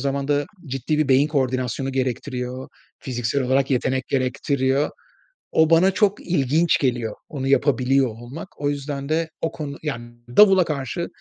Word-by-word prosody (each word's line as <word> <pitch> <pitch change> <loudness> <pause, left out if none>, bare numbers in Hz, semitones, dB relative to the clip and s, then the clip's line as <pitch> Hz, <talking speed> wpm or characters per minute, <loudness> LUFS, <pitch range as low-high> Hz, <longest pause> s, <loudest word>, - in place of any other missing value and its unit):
zamanda, 140 +1 0 0.2
ciddi 135 +3 -2
bir 155 - +1
beyin 135 +3 +4
koordinasyonu 130 -2 -1
gerektiriyor, 130 0 -3 0.3
fiziksel 125 +1 -2
olarak 135 +2 +1
yetenek 130 0 0
gerektiriyor. 135 +1 0 0.6
O 160 0 +4
bana 170 +4 +5
çok 200 +1 +1
ilginç 160 0 +2
geliyor, 120 -5 -1
onu 135 -3 -4
yapabiliyor 135 -1 +3
olmak. 125 - -9
O 145 - +1
yüzden 140 0 -4
de, 160 +1 0
o 165 - -1
konu 145 -3 -6
Ya, 150 -6 -2 0.4
davula 195 -3 +7
karşı 150 +3 -3
140 Hz, 140 wpm, -22 LUFS, 130-150 Hz, 0.6 s, davula